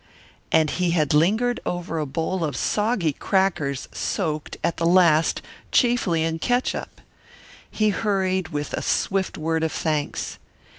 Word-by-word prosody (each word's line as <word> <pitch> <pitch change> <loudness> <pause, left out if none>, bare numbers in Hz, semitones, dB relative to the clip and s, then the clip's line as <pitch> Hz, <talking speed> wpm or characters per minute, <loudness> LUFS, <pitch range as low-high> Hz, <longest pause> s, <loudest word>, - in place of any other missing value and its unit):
And 155 -2 +3
he 180 -1 0
had 150 -2 +2
lingered 220 +11 +2
over 175 -2 -3
a 150 - -2
bowl 165 +6 -2
of 145 -6 -2
soggy 190 - +1
crackers 155 -7 0
soaked, 155 -6 -3
at 170 - 0
the 165 - 0
last, 170 -3 +4 0.3
chiefly 235 - +2
in 165 0 -1
catsup! 245 +7 -1 0.7
He 215 -1 +1
hurried, 190 -3 0
with 145 -3 -4
a - - -2
swift 195 -1 0
word 160 +1 -1
of 160 - 0
thanks. 155 -2 -2
170 Hz, 140 wpm, -23 LUFS, 155-195 Hz, 0.7 s, last